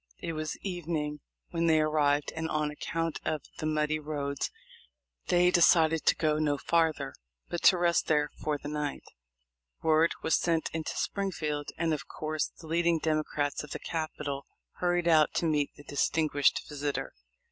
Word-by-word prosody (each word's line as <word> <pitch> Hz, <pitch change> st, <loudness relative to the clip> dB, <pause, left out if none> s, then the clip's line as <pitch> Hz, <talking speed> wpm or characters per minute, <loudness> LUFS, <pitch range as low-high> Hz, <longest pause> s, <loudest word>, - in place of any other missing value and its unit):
It 165 Hz, -, -4 dB
was 155 Hz, -1 st, -3 dB
evening 160 Hz, -5 st, -3 dB, 0.3 s
when 170 Hz, -1 st, +1 dB
they 160 Hz, -1 st, +5 dB
arrived, 150 Hz, -2 st, +2 dB
and 160 Hz, 0 st, -2 dB
on 150 Hz, -1 st, 0 dB
account 165 Hz, +2 st, -3 dB
of 155 Hz, -3 st, -2 dB, 0.2 s
the 155 Hz, -, -1 dB
muddy 155 Hz, 0 st, +1 dB
roads 145 Hz, -2 st, -3 dB, 0.8 s
they 180 Hz, 0 st, +4 dB
decided 165 Hz, -2 st, +4 dB
to -, -, +6 dB
go 155 Hz, -1 st, +1 dB
no 145 Hz, -2 st, +1 dB
farther, 155 Hz, -3 st, +1 dB, 0.4 s
but 175 Hz, -, -3 dB
to 185 Hz, -, +8 dB
rest 175 Hz, -1 st, +2 dB
there 150 Hz, -1 st, +2 dB
for 150 Hz, -1 st, -2 dB
the 145 Hz, -, -8 dB
night. 150 Hz, -1 st, -3 dB, 0.8 s
Word 160 Hz, +1 st, +4 dB
was 160 Hz, -, +3 dB
sent 165 Hz, -2 st, 0 dB
into 160 Hz, -1 st, -3 dB
Springfield, 155 Hz, -7 st, -2 dB
and 165 Hz, -1 st, +1 dB
of 155 Hz, 0 st, -4 dB
course 155 Hz, -1 st, -2 dB
the 165 Hz, -, -16 dB
leading 170 Hz, +1 st, +2 dB
Democrats 155 Hz, -2 st, -1 dB
of 150 Hz, -, -10 dB
the -, -, -5 dB
capital 150 Hz, -4 st, -4 dB, 0.3 s
hurried 175 Hz, -1 st, +1 dB
out 155 Hz, -2 st, +4 dB
to -, -, +1 dB
meet 150 Hz, -3 st, +1 dB
the 145 Hz, -, -13 dB
distinguished 145 Hz, 0 st, +1 dB
visitor. 145 Hz, -1 st, -3 dB
155 Hz, 160 wpm, -30 LUFS, 150-165 Hz, 0.8 s, to